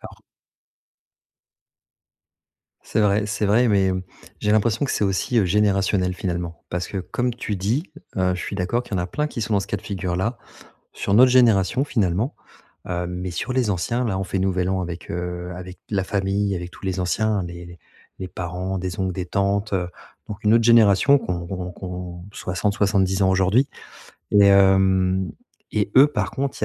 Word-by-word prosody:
Alors -, -, -12 dB, 2.6 s
C'est -, -, -1 dB
vrai 105 Hz, 0 st, +2 dB
c'est 105 Hz, 0 st, -1 dB
vrai 115 Hz, +4 st, +4 dB
mais, 100 Hz, -2 st, +3 dB
hem, 95 Hz, -1 st, -1 dB, 0.4 s
j'ai 105 Hz, -, 0 dB
l'impression 110 Hz, +4 st, +2 dB
que 135 Hz, -, -2 dB
c'est -, -, 0 dB
aussi, 100 Hz, +5 st, 0 dB
heu, 105 Hz, -, +4 dB
générationnel, 95 Hz, -1 st, +1 dB
finalement. 85 Hz, -2 st, -4 dB
Parce 90 Hz, 0 st, -3 dB
que 100 Hz, -, -4 dB
comme 120 Hz, +6 st, -2 dB
tu 105 Hz, -4 st, -4 dB
dis, 110 Hz, -, 0 dB, 0.3 s
heu, 90 Hz, -1 st, +2 dB
je 90 Hz, -, -5 dB
suis 100 Hz, -, -5 dB
d'accord 100 Hz, +6 st, 0 dB
qu'il 120 Hz, -, -16 dB
y -, -, 0 dB
en -, -, 0 dB
a 90 Hz, -, -3 dB
plein 150 Hz, +10 st, -2 dB
qui 135 Hz, -, -6 dB
sont 110 Hz, 0 st, -1 dB
dans 100 Hz, -, +3 dB
ce 100 Hz, -, -5 dB
cas 105 Hz, -, -2 dB
de -, -, -10 dB
figure-là, 95 Hz, +4 st, -2 dB, 0.5 s
sur 100 Hz, -, -1 dB
notre 125 Hz, +3 st, +7 dB
génération, 120 Hz, 0 st, +4 dB
finalement, 110 Hz, -, 0 dB, 0.5 s
heu, 90 Hz, 0 st, -2 dB
mais 90 Hz, 0 st, -4 dB
sur 110 Hz, +9 st, -3 dB
les 125 Hz, -4 st, +1 dB
anciens, 115 Hz, +7 st, -1 dB
là, 95 Hz, -5 st, -1 dB
on 95 Hz, -, -2 dB
fait 95 Hz, +2 st, -3 dB
Nouvel 95 Hz, -1 st, 0 dB
An 95 Hz, -1 st, 0 dB
avec, 85 Hz, -1 st, -7 dB
heu, 90 Hz, 0 st, -4 dB
avec 90 Hz, 0 st, -9 dB
la 95 Hz, -3 st, 0 dB
famille, 100 Hz, 0 st, 0 dB
avec 90 Hz, 0 st, -6 dB
tous -, -, -14 dB
les 95 Hz, 0 st, -2 dB
anciens, 105 Hz, +3 st, 0 dB
les 85 Hz, 0 st, -8 dB
les 85 Hz, 0 st, -12 dB, 0.4 s
les 95 Hz, -, -4 dB
parents, 90 Hz, +2 st, -4 dB
des 90 Hz, -1 st, -4 dB
oncles, 95 Hz, -1 st, 0 dB
des 90 Hz, 0 st, -4 dB
tantes, 100 Hz, +3 st, 0 dB
heu, 90 Hz, -2 st, 0 dB, 0.4 s
donc 105 Hz, -1 st, -8 dB
une 105 Hz, +1 st, +5 dB
autre 115 Hz, -, +4 dB
génération 115 Hz, +4 st, +6 dB
qu'ont 85 Hz, -6 st, -4 dB
qu'ont 90 Hz, 0 st, -5 dB
qu'ont 90 Hz, -1 st, -7 dB
60-70 100 Hz, 0 st, 0 dB
ans 95 Hz, -, +4 dB
aujourd'hui, 95 Hz, +8 st, +3 dB, 0.6 s
et 100 Hz, -1 st, +6 dB
hem, 95 Hz, -1 st, +4 dB, 0.4 s
et 105 Hz, -1 st, -1 dB
eux, 135 Hz, +3 st, +8 dB
par 150 Hz, -, -2 dB
contre, 135 Hz, 0 st, -3 dB
il -, -, +1 dB
95 Hz, 190 wpm, -22 LUFS, 90-105 Hz, 2.6 s, eux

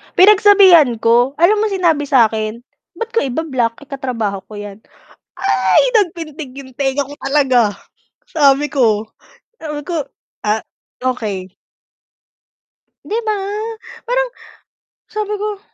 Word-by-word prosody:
Pinagsabihan 380 Hz, -, +6 dB
ko, 240 Hz, +4 st, +2 dB
alam 360 Hz, +7 st, +3 dB
mo 435 Hz, -, +1 dB
sinabi 340 Hz, -8 st, +1 dB
sa'kin? 225 Hz, -3 st, +1 dB, 0.3 s
"Ba't 460 Hz, 0 st, -5 dB
ko 460 Hz, -, +2 dB
iba-block, 260 Hz, -3 st, -2 dB
eh, -, -, -18 dB
katrabaho 230 Hz, -7 st, -3 dB
ko 215 Hz, -, -11 dB
yan?" 205 Hz, 0 st, -8 dB, 0.6 s
Ay! -, -, +2 dB, 0.2 s
Nagpintig 320 Hz, -8 st, -4 dB
yung 270 Hz, -1 st, -10 dB
tenga 275 Hz, 0 st, 0 dB
ko 280 Hz, +1 st, -10 dB
talaga! 270 Hz, -3 st, +2 dB, 0.7 s
Sabi 290 Hz, -2 st, +3 dB
ko 220 Hz, -6 st, +1 dB, 0.5 s
sabi 300 Hz, -2 st, -4 dB
ko, 335 Hz, -4 st, -1 dB, 0.4 s
"Ah, 215 Hz, +1 st, 0 dB, 0.4 s
okey." 215 Hz, -7 st, -2 dB, 1.6 s
'Di 440 Hz, +3 st, -2 dB
ba? 430 Hz, -, +1 dB, 0.7 s
Parang -, -, 0 dB, 0.8 s
sabi 425 Hz, -1 st, -3 dB
ko, 415 Hz, 0 st, -4 dB
280 Hz, 115 wpm, -17 LUFS, 235-365 Hz, 1.6 s, Pinagsabihan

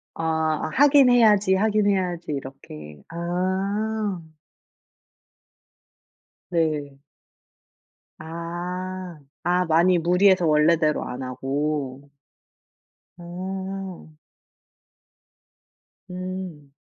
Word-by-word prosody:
아 160 Hz, -1 st, -1 dB
'하긴 280 Hz, -2 st, +6 dB
해야지, 210 Hz, -5 st, +5 dB
하긴 210 Hz, +1 st, +2 dB
해야지.' 180 Hz, -4 st, -1 dB
이렇게. 75 Hz, -, -9 dB
아. 190 Hz, +4 st, -2 dB, 2.3 s
네. 150 Hz, -5 st, -1 dB, 1.2 s
아. 175 Hz, +2 st, -6 dB, 0.2 s
아 180 Hz, +1 st, +2 dB
많이 170 Hz, +3 st, +4 dB
무리해서 180 Hz, +2 st, +4 dB
원래대로 155 Hz, 0 st, +3 dB
안 130 Hz, +1 st, -6 dB
하고? 140 Hz, +1 st, -3 dB, 1.1 s
어. 190 Hz, 0 st, -6 dB, 2.0 s
음. 180 Hz, -5 st, -6 dB
175 Hz, 120 characters per minute, -24 LUFS, 155-190 Hz, 2.3 s, 하긴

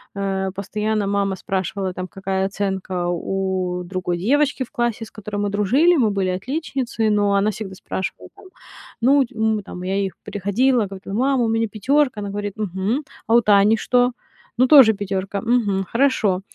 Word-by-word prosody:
Э, 195 Hz, -1 st, -2 dB
постоянно 210 Hz, +2 st, -2 dB
мама 200 Hz, -1 st, 0 dB
спрашивала, 190 Hz, 0 st, -3 dB
там, 185 Hz, 0 st, -5 dB
какая 190 Hz, 0 st, -2 dB
оценка 190 Hz, -2 st, -2 dB
у 185 Hz, 0 st, -2 dB
другой 180 Hz, -1 st, -3 dB
девочки 280 Hz, +7 st, +1 dB
в 245 Hz, -, -13 dB
классе, 240 Hz, -1 st, -1 dB
с 220 Hz, -, -16 dB
которой 210 Hz, -1 st, -7 dB
мы 205 Hz, -, 0 dB
дружили. 255 Hz, -, +3 dB
Мы 225 Hz, -6 st, +3 dB
были 195 Hz, -2 st, 0 dB
отличницы, 250 Hz, -, -2 dB
но 205 Hz, -1 st, +2 dB
она 200 Hz, +2 st, +2 dB
всегда 195 Hz, -2 st, -7 dB
спрашивала, 190 Hz, 0 st, -5 dB
там, -, -, -16 dB, 0.6 s
ну, 270 Hz, +3 st, +4 dB
м, 220 Hz, -1 st, 0 dB
там 180 Hz, -1 st, -8 dB
я 190 Hz, +1 st, -2 dB
ей, 195 Hz, -1 st, 0 dB
приходила, 220 Hz, +5 st, +1 dB
говорила: 195 Hz, 0 st, -8 dB
"Мама, 260 Hz, +3 st, +2 dB
у -, -, +1 dB
меня 225 Hz, 0 st, +1 dB
пятёрка!" 255 Hz, +4 st, +1 dB
Она 205 Hz, -, -4 dB
говорит: 205 Hz, 0 st, -4 dB
"Мгм, 205 Hz, +4 st, -1 dB, 0.3 s
а 225 Hz, -, +2 dB
у 235 Hz, -, +6 dB
Тани 210 Hz, 0 st, +4 dB
что?" 245 Hz, +2 st, +2 dB, 0.5 s
"Ну, 255 Hz, +2 st, +4 dB
тоже 260 Hz, -6 st, +8 dB
пятёрка". 195 Hz, 0 st, -3 dB
"Мгм, 210 Hz, -5 st, +1 dB
хорошо". 230 Hz, -7 st, +2 dB
205 Hz, 170 wpm, -21 LUFS, 190-235 Hz, 0.6 s, тоже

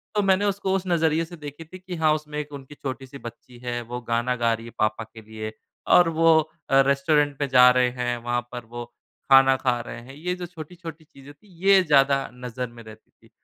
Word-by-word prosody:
तो 210 Hz, -, +3 dB
मैंने 195 Hz, +1 st, +3 dB
उसको 195 Hz, -1 st, -1 dB
उस 190 Hz, -, -1 dB
नज़रिए 165 Hz, -1 st, +1 dB
से 175 Hz, +2 st, -11 dB
देखी 145 Hz, +1 st, -9 dB
थी 185 Hz, +4 st, -12 dB
कि 185 Hz, -1 st, -7 dB
हाँ, 160 Hz, -2 st, +3 dB
उसमें 150 Hz, -1 st, -5 dB
एक 150 Hz, 0 st, -6 dB
उनकी 140 Hz, +1 st, -10 dB
छोटी-सी 135 Hz, 0 st, -7 dB
बच्ची 120 Hz, 0 st, -11 dB
है, 120 Hz, 0 st, -2 dB
वो 120 Hz, +1 st, -6 dB
गाना 120 Hz, +1 st, -1 dB
गा 115 Hz, -1 st, +1 dB
रही 115 Hz, +1 st, -6 dB
है 115 Hz, -, -10 dB
पापा 110 Hz, +1 st, 0 dB
के 110 Hz, 0 st, -14 dB
लिए 110 Hz, 0 st, -7 dB, 0.4 s
और 175 Hz, -2 st, +6 dB
वो 165 Hz, 0 st, +4 dB, 0.3 s
अ, 135 Hz, 0 st, +6 dB
रेस्टोरेंट 145 Hz, 0 st, +2 dB
पे 140 Hz, -, 0 dB
जा 125 Hz, -1 st, +7 dB
रहे 125 Hz, 0 st, +3 dB
हैं, 120 Hz, -1 st, -2 dB
वहाँ 120 Hz, +1 st, -2 dB
पर 120 Hz, -2 st, -7 dB
वो 120 Hz, 0 st, -5 dB, 0.5 s
खाना 135 Hz, 0 st, +7 dB
खा 125 Hz, -2 st, 0 dB
रहे 115 Hz, -, -7 dB
हैं। 130 Hz, +3 st, -13 dB
ये 180 Hz, +4 st, -3 dB
जो 180 Hz, -1 st, -6 dB
छोटी-छोटी 165 Hz, -1 st, -10 dB
चीजें 140 Hz, -1 st, -15 dB
थीं, 200 Hz, +8 st, -25 dB, 0.2 s
ये 195 Hz, -1 st, +7 dB
ज़्यादा 140 Hz, -3 st, +3 dB
नज़र 125 Hz, 0 st, -5 dB
में 120 Hz, -1 st, -13 dB
रहती 110 Hz, 0 st, -15 dB
थीं। -, -, -25 dB
135 Hz, 225 wpm, -24 LUFS, 120-160 Hz, 0.5 s, जा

